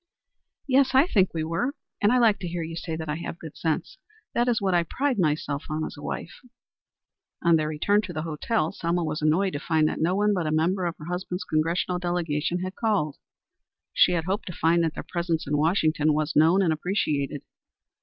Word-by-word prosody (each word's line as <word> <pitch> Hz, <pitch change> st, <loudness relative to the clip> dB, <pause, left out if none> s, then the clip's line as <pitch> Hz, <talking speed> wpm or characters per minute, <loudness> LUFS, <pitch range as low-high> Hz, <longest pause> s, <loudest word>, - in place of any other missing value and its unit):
"Yes, 270 Hz, 0 st, +3 dB
I 270 Hz, +4 st, +7 dB
think 195 Hz, -, +2 dB
we 160 Hz, -1 st, -2 dB
were. 175 Hz, -, -1 dB, 0.3 s
And 205 Hz, -, +4 dB
I 250 Hz, -, +4 dB
like 230 Hz, -4 st, +4 dB
to 180 Hz, -, -4 dB
hear 170 Hz, 0 st, -3 dB
you 165 Hz, +1 st, -6 dB
say 165 Hz, -1 st, -4 dB
I 150 Hz, +1 st, -2 dB
have 170 Hz, -, -6 dB
good 160 Hz, -3 st, -10 dB
sense. 160 Hz, -2 st, -2 dB, 0.3 s
That 240 Hz, +1 st, +1 dB
is 240 Hz, -3 st, +2 dB
what 195 Hz, -2 st, 0 dB
I 175 Hz, -, +4 dB
pride 255 Hz, -, -1 dB
myself 150 Hz, -3 st, 0 dB
on 155 Hz, +1 st, -2 dB
as -, -, -7 dB
a 145 Hz, -, -11 dB
wife." 165 Hz, -, -6 dB, 1.0 s
On 170 Hz, -1 st, +5 dB
their 155 Hz, -1 st, +1 dB
return 180 Hz, +7 st, +2 dB
to 180 Hz, -, -7 dB
the 155 Hz, -, -3 dB
hotel 165 Hz, +3 st, -1 dB
Selma 170 Hz, +1 st, -1 dB
was 155 Hz, -1 st, -3 dB
annoyed 175 Hz, +6 st, +2 dB
to 145 Hz, -, -2 dB
find 155 Hz, 0 st, +2 dB
that -, -, -4 dB
no 175 Hz, +3 st, +2 dB
one 210 Hz, +1 st, +2 dB
but 175 Hz, -5 st, -1 dB
a -, -, 0 dB
member 175 Hz, +4 st, +1 dB
of 170 Hz, -, -2 dB
her 150 Hz, -, -10 dB
husband's 180 Hz, +2 st, -4 dB
Congressional 170 Hz, +3 st, 0 dB
delegation 175 Hz, -1 st, -1 dB
had 185 Hz, 0 st, -4 dB
called. 200 Hz, -, 0 dB, 0.8 s
She 180 Hz, -, +5 dB
had 170 Hz, -2 st, 0 dB
hoped 195 Hz, +5 st, -2 dB
to 180 Hz, -, -5 dB
find 165 Hz, +2 st, +2 dB
that 160 Hz, -1 st, -1 dB
their -, -, -6 dB
presence 170 Hz, -2 st, -1 dB
in 150 Hz, -, -1 dB
Washington 155 Hz, -1 st, +2 dB
was 155 Hz, +1 st, -1 dB
known 165 Hz, +6 st, +5 dB
and 165 Hz, -3 st, +2 dB
appreciated. 150 Hz, -5 st, -1 dB
170 Hz, 215 wpm, -26 LUFS, 155-190 Hz, 1.0 s, I